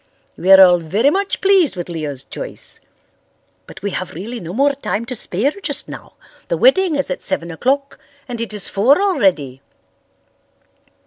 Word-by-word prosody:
We 185 - 0
are 190 - +10
all 180 -1 +5
very 205 - +1
much 395 +3 -2
pleased 385 - +3
with 175 -1 -5
Leo's 150 -6 -5
choice. - - -9 0.9
But - - -13
we 200 - -2
have 185 -2 -5
really 225 +8 -6
no 170 -4 -7
more 280 +7 +2
time 230 -5 -3
to 255 - -5
spare 225 +3 -1
just - - -2
now. - - -10 0.3
The - - -1
wedding 380 -9 +3
is 280 -9 -1
at - - -4
seven 170 0 -2
o'clock 275 - -1 0.3
and 240 -2 -5
it 230 - -4
is 210 -2 -3
four 245 - +3
already." 190 - 0
215 Hz, 170 wpm, -18 LUFS, 180-285 Hz, 0.9 s, are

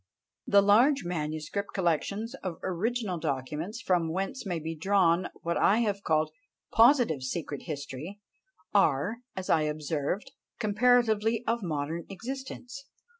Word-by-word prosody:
The 200 -1 +6
large 240 +7 +5
manuscript 155 +3 -3
collections 200 - 0
of 180 -4 -4
original 200 0 -1
documents, 155 - -3
from 170 -3 +1
whence 195 +6 -3
may 175 -3 -1
be 160 +1 -4
drawn 180 0 +3 0.2
what 170 0 0
I 215 +4 +4
have 205 -3 0
called 155 -3 +1 0.4
positive 235 - +5
secret 145 +2 -4
history, 145 +6 -6 0.5
are, 195 +2 +3 0.2
as 190 -1 -5
I 160 - +4
observed, 150 +4 -2 0.3
comparatively 225 0 +3
of 230 +1 0
modern 160 -1 -3
existence. 260 +5 -7
185 Hz, 125 wpm, -29 LUFS, 155-220 Hz, 0.5 s, The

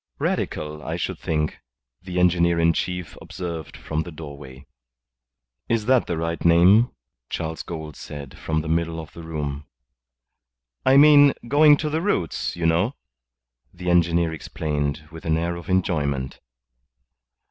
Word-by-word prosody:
"Radical, 75 0 -2
I 80 +2 -4
should 85 - -3
think," 75 -1 -2 0.4
the 90 0 -3
engineer 85 -1 +3
in 85 0 +4
chief 90 -4 -3
observed 85 -4 -6
from 80 0 -3
the 85 - -7
doorway. 70 -3 -10 1.0
"Is 115 -2 +1
that 130 0 +3
the 85 - -2
right 85 +1 -3
name?" 90 +8 +6 0.4
Charles 80 0 -4
Gould 80 -4 -7
said, 70 -2 -9
from 80 -1 -2
the 80 - -7
middle 85 0 0
of 80 -1 -9
the 85 - -9
room. 75 -3 -5 1.2
"I 135 +1 +7
mean, 145 -1 +7
going 145 +2 +6
to 155 - -2
the 160 +2 0
roots, 165 - -1
you 85 -1 -3
know," 90 +11 +2 0.8
the 90 0 -3
engineer 85 -1 +2
explained, 75 -1 -3
with 80 0 -10
an 80 -1 +1
air 85 +1 -1
of 85 +1 -9
enjoyment. 75 -8 0
85 Hz, 145 wpm, -23 LUFS, 75-90 Hz, 1.2 s, I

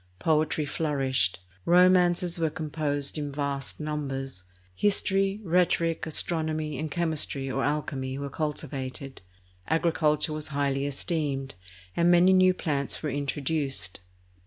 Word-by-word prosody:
Poetry 155 - +1
flourished; 135 - 0 0.2
romances 180 0 +4
were 160 -1 +2
composed 150 -2 -1
in 145 -1 -3
vast 140 -1 -3
numbers; 135 -8 -4 0.3
history, 195 - +2
rheto 175 +1 +3
ric, 165 -1 -1
astronomy, 155 -2 0
and 155 0 -3
chemistry 155 -4 0
or 135 +1 -1
alchemy 140 -3 -2
were 140 0 -5
cultivated; 140 -3 -4 0.5
agriculture 160 -2 +1
was 155 -1 -4
highly 140 -1 0
esteemed, 140 -2 -2 0.4
and 170 +1 +3
many 175 +2 +6
new 185 0 +6
plants 145 -6 -1
were 150 - -1
introduced. 140 - -1
150 Hz, 115 wpm, -27 LUFS, 140-165 Hz, 0.5 s, many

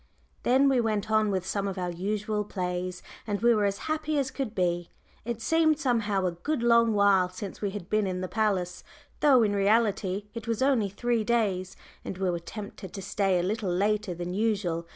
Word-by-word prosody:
Then 265 +3 +4
we 265 -3 +3
went 215 -1 -1
on 215 -1 +3
with 190 -2 -1
some 200 +1 -1
of 195 -1 -4
our 180 -1 -2
usual 210 +4 -2
plays, 180 -2 -4 0.2
and 205 -1 -1
we 235 +1 +4
were 210 -2 +2
as 200 0 0
happy 310 -1 -1
as 275 -2 0
could 260 -6 -4
be. 175 -2 0 0.4
It 235 -1 -4
seemed 320 -2 +3
somehow 225 -9 0
a 180 - +1
good 235 - -3
long 235 -1 +4
while 200 -3 +4
since 185 +1 -8
we 205 - 0
had 195 -3 -7
been 215 -1 +1
in 185 -1 -2
the 185 - -2
palace, 190 -4 -1 0.4
though 265 -5 +5
in 205 -2 +1
reality 200 -1 +1
it 230 -1 -7
was 230 +2 0
only 250 -7 +2
three 235 +3 0
days, 205 -5 0 0.3
and 185 - -6
we 190 -1 0
were 170 - -2
tempted 200 +1 -8
to 195 - -6
stay 195 -2 +1
a 175 - 0
little 205 +1 -1
later 205 +1 0
than 175 +1 -4
usual. 195 -6 -1
205 Hz, 205 wpm, -28 LUFS, 185-230 Hz, 0.4 s, though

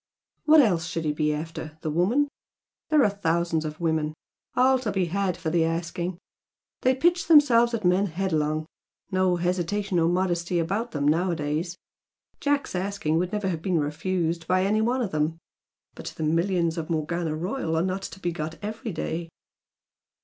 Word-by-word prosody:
"What 310 0 +8
else 175 - +1
should 165 0 -3
he 150 - +1
be 150 0 +1
after? 155 0 -5
The 155 - -2
woman? 210 - +2 0.6
There 305 -3 +5
are - - +4
thousands 170 -4 0
of 155 0 -5
women, 160 -2 0 0.4
all 260 +1 +4
to 230 -5 -2
be 190 -2 +1
had 185 +1 -1
for 160 - -3
the 170 -1 +3
asking 170 +2 -2 0.6
they 255 +1 +3
pitch 345 +5 +2
themselves 245 -7 +6
at 215 -4 -4
men 185 +3 +3
headlong 155 -4 -1 0.5
no 185 -1 +2
hesitation 180 +2 0
or 165 0 +3
modesty 175 -1 0
about 200 +8 -1
them 145 -6 -1
nowadays! 165 +1 0 0.6
Jack's 285 -1 0
asking 180 -4 -1
would 180 +1 -1
never 210 -2 -1
have 165 -3 -3
been 180 -2 +1
refused 165 +2 -1
by 185 +1 +2
any 215 +2 +2
one 245 +3 +1
of 205 - -3
them. 155 +2 0 0.6
But - - -9
the 160 - -3
millions 170 +1 +1
of 160 - -5
Morgana 160 0 -1
Royal 175 +1 -2
are 160 - +2
not 190 +1 -2
to 190 - -8
be 175 -2 -1
got 160 -1 -5
every 220 +2 -4
day!" 165 -1 -4
175 Hz, 170 wpm, -26 LUFS, 160-200 Hz, 0.6 s, What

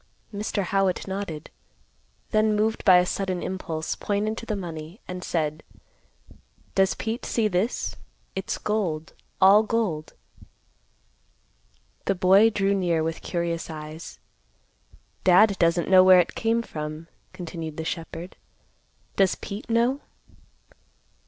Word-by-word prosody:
Mr. 205 0 -2
Howitt 195 0 0
nodded; 190 -6 -5 0.8
then, 215 -1 +3
moved 220 +1 0
by 185 -3 +7
a 180 - +4
sudden 185 -1 -2
impulse, 165 -4 -3
pointed 210 +2 -1
to 230 - -10
the 215 - -1
money, 170 0 -7
and 180 0 -6
said, 155 -2 -1 1.1
"Does 190 -3 +3
Pete 225 +2 -4
see 225 -2 +1
this? 200 +4 -1 0.4
It's - - -3
gold, 180 -8 -2 0.3
all 195 +3 +7
gold." 215 -9 -2 1.9
The - - +1
boy 190 +4 +6
drew 200 -2 +1
near 175 -5 +1
with 165 0 -3
curious 170 -1 -3
eyes. 155 +1 -8 1.1
"Dad 195 +3 +6
doesn't 170 0 +2
know 185 -1 +7
where 185 -1 +8
it 175 - +1
came 230 +1 0
from," 155 -2 -6 0.2
continued 165 -3 -7
the 160 - -4
shepherd. 165 +1 -6 0.8
"Does 195 -2 +3
Pete 205 +4 -8
know?" 240 +5 +2
185 Hz, 120 wpm, -25 LUFS, 165-210 Hz, 1.9 s, where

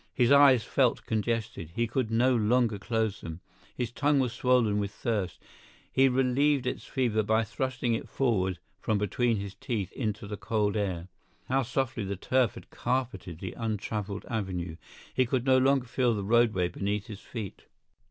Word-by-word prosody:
His 120 0 +3
eyes 140 -4 +7
felt 130 0 +1
congested; 110 -6 -2
he 115 - +2
could 115 0 -1
no 125 +3 +3
longer 115 -1 +2
close 110 -1 -1
them. 80 0 -7 0.4
His 120 -2 -2
tongue 145 +3 +2
was 125 -3 0
swollen 120 -4 +2
with 100 -1 -1
thirst; 100 -4 -2 0.5
he 135 0 +5
relieved 135 +2 +2
its 125 - -3
fever 120 -5 +1
by 110 +2 +2
thrusting 125 +1 -2
it 110 - -3
forward 95 -9 +1 0.2
from 110 - 0
between 110 +3 +1
his 100 -1 -5
teeth 110 -4 -3
into 110 -3 -3
the 105 0 -5
cold 105 -2 0
air. 95 -5 -2 0.4
How 135 +1 +3
softly 125 -2 -1
the 100 0 -3
turf 125 +5 +1
had - - -12
carpeted 120 -9 -2
the 90 +1 -6
untraveled 105 -2 -3
avenue—he 95 +2 -3
could 125 0 0
no 130 -1 +5
longer 135 0 +3
feel 120 -1 +1
the 100 - -3
roadway 110 -4 +3
beneath 100 +3 -2
his 105 -3 -8
feet! 110 -6 -7
115 Hz, 165 wpm, -29 LUFS, 100-125 Hz, 0.5 s, eyes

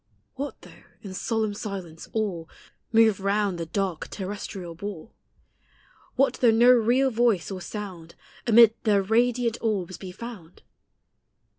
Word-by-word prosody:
What 280 +2 -6
though, - - -15 0.2
in 195 -3 -7
solemn 220 +2 -1
silence, 190 -6 -7
all 190 -7 -2 0.4
Move 225 -3 +4
round 200 -2 0
the 165 - -4
dark 185 -1 -2
terrestrial 190 -2 -6
ball? 200 +2 -8 1.0
What 275 -1 +3
though 245 - +6
no 235 +3 +6
real 250 +3 +3
voice 225 -6 +1
or 185 -1 -5
sound 185 -5 -7 0.3
Amid 230 -1 +7
their 205 -3 +2
radiant 235 +2 +1
orbs 190 -6 -2
be 185 -2 -7
found? 190 -5 -10
205 Hz, 130 wpm, -26 LUFS, 185-230 Hz, 1.0 s, Amid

